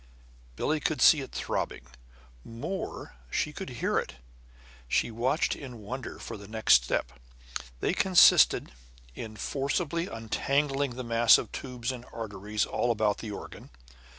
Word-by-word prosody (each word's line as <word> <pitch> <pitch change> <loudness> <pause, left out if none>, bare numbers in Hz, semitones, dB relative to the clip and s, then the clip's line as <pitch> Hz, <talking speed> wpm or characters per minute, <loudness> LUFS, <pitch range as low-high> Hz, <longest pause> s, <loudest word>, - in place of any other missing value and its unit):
Billie 155 - 0
could 155 +1 -1
see 155 - +7
it 130 - -8
throbbing; - - -3 0.6
more, 140 +12 -6 0.2
she - - -1
could - - -6
hear - - 0
it. - - -6 0.7
She 115 - +1
watched 125 +7 0
in 130 -4 -9
wonder 125 +5 -6
for 115 - -7
the 100 -1 -11
next 110 - +4
step. - - -1 0.7
They - - +1
consisted 185 -2 +6 0.4
in 110 - -7
forcibly 145 - -1
untangling 140 +4 -1
the 130 - -5
mass 115 -1 +6
of - - -5
tubes 125 -2 -4
and 125 -1 -8
arteries 105 -1 -3
all 120 - -1
about 110 -3 +1
the 110 - -6
organ. 105 - -9
120 Hz, 140 wpm, -29 LUFS, 110-140 Hz, 0.7 s, see